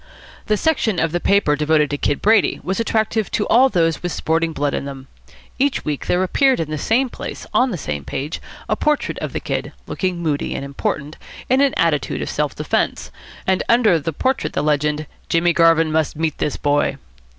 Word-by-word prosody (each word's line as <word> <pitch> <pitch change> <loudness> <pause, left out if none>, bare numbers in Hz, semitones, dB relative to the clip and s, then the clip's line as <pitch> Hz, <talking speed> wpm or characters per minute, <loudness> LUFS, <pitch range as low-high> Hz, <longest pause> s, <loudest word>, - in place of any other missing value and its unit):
The 215 - +2
section 230 - +1
of 160 0 +1
the 175 - 0
paper 195 -6 +3
devoted 150 0 +2
to 145 - -1
Kid 145 - -1
Brady 215 -1 +3
was 190 +3 -2
attractive 220 -1 0
to 210 - 0
all 260 +3 +6
those 165 -6 +1
with 175 - -3
sporting 165 +1 0
blood 145 -2 -1
in - - -2
them. 135 -1 -8 0.5
Each 280 0 +1
week 150 -2 -3
there 180 +1 +2
appeared 265 +8 +2
in 160 -2 -3
the 155 - -2
same 245 - +2
place - - -7
on 255 - +3
the 185 - -3
same 75 - -4
page 140 - -4 0.3
a - - +1
portrait 300 -1 0
of - - -4
the - - -3
Kid, - - -4
looking 185 -2 -2
moody 155 -4 -2
and 140 - -4
important, 140 +2 -3 0.3
in 260 +1 +4
an 280 -1 +2
attitude 145 - 0
of - - -4
self - - -1
defence, - - -1 0.3
and 190 -1 +2
under 225 -8 +4
the 155 +2 -3
portrait 260 - -1
the - - -1
legend, 150 0 0 0.2
"Jimmy 170 +1 +3
Garvin 165 -1 +4
must 155 -1 0
meet 160 0 -2
this 150 - -1
boy." 145 -1 +1
165 Hz, 200 wpm, -20 LUFS, 150-215 Hz, 0.5 s, all